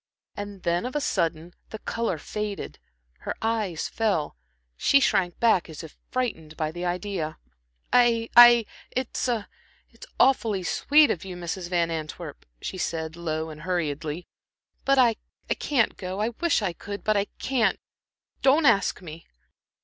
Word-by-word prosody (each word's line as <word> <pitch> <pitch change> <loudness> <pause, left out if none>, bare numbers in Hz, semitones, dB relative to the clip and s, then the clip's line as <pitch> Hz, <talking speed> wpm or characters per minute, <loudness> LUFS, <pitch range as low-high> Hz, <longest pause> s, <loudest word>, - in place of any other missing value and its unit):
And 205 -2 -7
then 175 +7 0
of 255 - -8
a - - +2
sudden 170 - -1 0.2
the 220 - -6
color 230 -4 -2
faded, 210 +5 -5 0.4
her - - -4
eyes 215 -7 -1
fell, 200 -9 -1 0.4
she 280 - +4
shrank 180 -9 +1
back 220 -8 +3
as 160 0 -8
if 160 - -11
frightened 165 -12 -3
at 155 0 -1
the 175 +1 -5
idea. 180 -3 -3 0.6
"I 235 -2 +4
I 240 -1 +9 0.2
it's 255 0 -2 0.9
awfully 225 -8 +3
sweet 295 - +4
of 170 - -3
you, 185 -2 -7
Mrs. 175 +1 -5
Van 170 -2 +1
Antwerp," 155 -2 -6 0.2
she 185 - -4
said, 160 -2 -3
low 160 -2 -3
and 150 0 -10
hurriedly, 165 -2 -2 0.6
"but 275 0 +4
I 240 -4 +5 0.3
I - - +6
can't 260 -6 +1
go 185 +1 -5
I 215 +2 +1
wish 285 0 0
I 185 -4 -1
could, 200 +4 -7
but 215 - +2
I 200 0 +2
can't. 250 -4 +1 0.6
Don't 280 +4 +4
don't - - +1
ask 195 -5 +3
me." 165 0 -10
190 Hz, 155 wpm, -26 LUFS, 165-230 Hz, 0.9 s, I